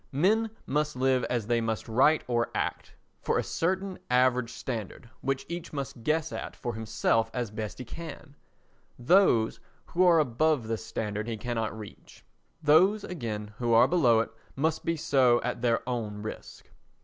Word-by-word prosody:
Men 210 +11 +2 0.2
must 150 +1 -1
live 130 0 +2
as 120 -4 -1
they 120 +1 +1
must 110 -1 -2
write 135 +7 +4
or 120 -1 0
act—for - - -3
a - - +1
certain 190 +3 -2
average 125 -1 +3
standard 115 -3 -6
which 135 0 -2
each 170 0 -6
must 140 -4 -5
guess 155 +5 0
at - - -6
for 120 -2 -4
himself 110 +1 0
as 120 -4 -2
best 105 -1 -5
he 125 - -7
can; 160 +1 -9 0.6
those 125 - +3 0.3
who 180 - +1
are 175 -2 +6
above 150 -2 +2
this 110 -1 -3
standard 105 -1 -4
he 115 -1 -3
cannot 115 -1 -3
reach; 105 -2 -12 0.4
those, 185 +8 +5
again, 110 -10 -5
who 120 -1 +1
are 120 +2 +7
below 125 -10 +4
it - - -5 0.2
must 160 +3 0
be 165 - 0
so 130 -5 +3
at 125 -1 -3
their 115 -1 +1
own 110 -4 -3
risk. 110 - -9
125 Hz, 160 wpm, -28 LUFS, 115-155 Hz, 0.6 s, are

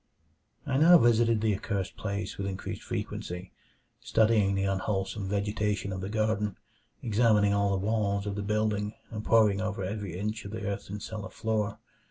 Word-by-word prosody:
I 135 -2 0
now 170 +4 +8
visited 115 -4 +4
the 110 -2 +2
accursed 100 -1 -3
place 100 -1 -4
with 100 - -3
increased 95 -1 -5
frequency; 90 +1 -5 0.5
studying 110 -3 +3
the 95 - 0
unwholesome 95 0 -1
vegetation 105 0 -1
of 95 - -4
the 95 - -4
garden, 110 -2 0 0.5
examining 105 -3 +3
all 100 0 +2
the 95 0 0
walls 105 -2 0
of 100 - -2
the 100 - -3
building, 105 0 0 0.2
and 105 -1 -5
poring 110 -3 +4
over 105 -2 -2
every 100 -2 -4
inch 105 +3 -3
of 100 - -8
the 110 -2 -4
earthen 100 0 -4
cellar 110 0 -6
floor. 110 -2 -1
105 Hz, 165 wpm, -29 LUFS, 100-110 Hz, 0.5 s, now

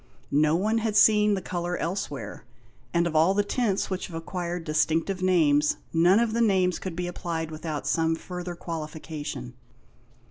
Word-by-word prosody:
No 150 +2 +4
one 215 +6 +1
had 220 -2 -1
seen 210 -1 +5
the 190 - -5
colour 175 0 -3
elsewhere; 165 -5 -4 0.5
and 170 0 +2
of 165 -2 -2
all 165 +5 +4
the 205 - +3
tints 205 -3 -1
which 185 - -3
have 170 - -9
acquired 175 +1 -4
distinctive 160 +4 0
names, 150 -5 +3 0.2
none 175 +5 +5
of 235 -2 +1
the 235 - +1
names 190 -5 +2
could 185 -3 -5
be 180 +1 -2
applied 165 -2 -4
without 155 -1 -5
some 165 0 +1
further 180 +1 -6
qualification. 155 -6 -6
175 Hz, 165 wpm, -26 LUFS, 160-190 Hz, 0.5 s, seen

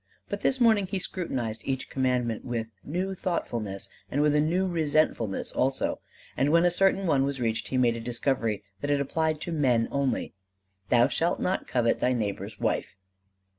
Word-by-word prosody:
But - - -3
this 265 - +1
morning 220 -5 +4
he 195 - -2
scrutinized 125 - -3
each 130 -1 -2
Commandment 125 -4 0
with 120 -3 -2 0.2
new 185 +6 -2
thoughtfulness 115 - -3 0.2
and 140 - -1
with 150 -1 +3
a 150 - +4
new 175 +5 +1
resentfulness 155 - 0
also; 130 +1 0 0.4
and 135 - +2
when 170 +3 +5
a 175 - +4
certain 195 +2 +2
one 140 -6 +3
was 140 -1 -1
reached 115 -2 -1
he 130 - -1
made 120 -2 +3
a - - -4
discovery 115 -3 -1 0.2
that 145 - -3
it 145 -1 +3
applied 155 +2 0
to 175 - -4
men 130 -7 +2
only: 140 -4 -1 0.6
"Thou 120 -1 +5
shalt 170 +1 0
not 185 +1 -1
covet 115 -2 +1
thy 125 - +2
neighbor's 105 -2 -3
wife." - - -1
135 Hz, 175 wpm, -27 LUFS, 115-170 Hz, 0.6 s, when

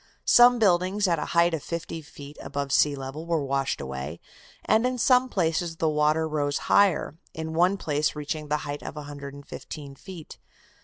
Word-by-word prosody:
Some 245 0 +7
buildings 195 -1 +2
at 170 -3 +1
a - - -2
height 170 0 +5
of 160 - -2
fifty 165 0 -5
feet 145 -1 -12
above 140 -1 -4
sea 145 +1 +3
level 135 +4 -7
were 165 -4 0
washed 135 0 -1
away, 65 +5 -6 0.5
and 220 - +3
in 255 0 -2
some 255 +1 +4
places 165 -3 -1
the 160 -1 0
water 155 +1 +2
rose 145 -2 -1 0.2
higher, 180 -5 +3 0.2
in 160 0 -5
one 180 +4 +3
place 150 -3 -1
reaching 150 +1 -4
the 150 +1 +1
height 145 0 -5
of - - -7
115 145 0 -8
feet. 165 +3 -11
155 Hz, 170 wpm, -26 LUFS, 145-175 Hz, 0.5 s, Some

